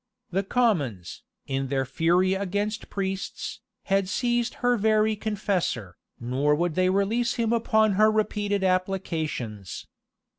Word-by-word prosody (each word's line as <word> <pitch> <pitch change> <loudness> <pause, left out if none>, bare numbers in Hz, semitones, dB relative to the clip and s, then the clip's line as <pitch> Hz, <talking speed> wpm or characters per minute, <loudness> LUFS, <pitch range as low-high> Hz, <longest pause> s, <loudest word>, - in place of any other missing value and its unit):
The 190 +2 +1
commons, 170 - 0 0.2
in 135 0 -2
their 135 0 0
fury 175 +6 +2
against 205 +3 -2
priests, 195 -1 -4 0.2
had 195 -1 +1
seized 240 +2 0
her 245 0 +4
very 215 0 +2
confessor, 190 - -2 0.2
nor 135 +5 +1
would 170 +1 0
they 185 +2 +2
release 200 +5 +1
him 230 -1 +1
upon 220 -2 +3
her 215 +3 +5
repeated 205 -2 0
applications. 165 - -2
195 Hz, 120 wpm, -26 LUFS, 160-215 Hz, 0.2 s, her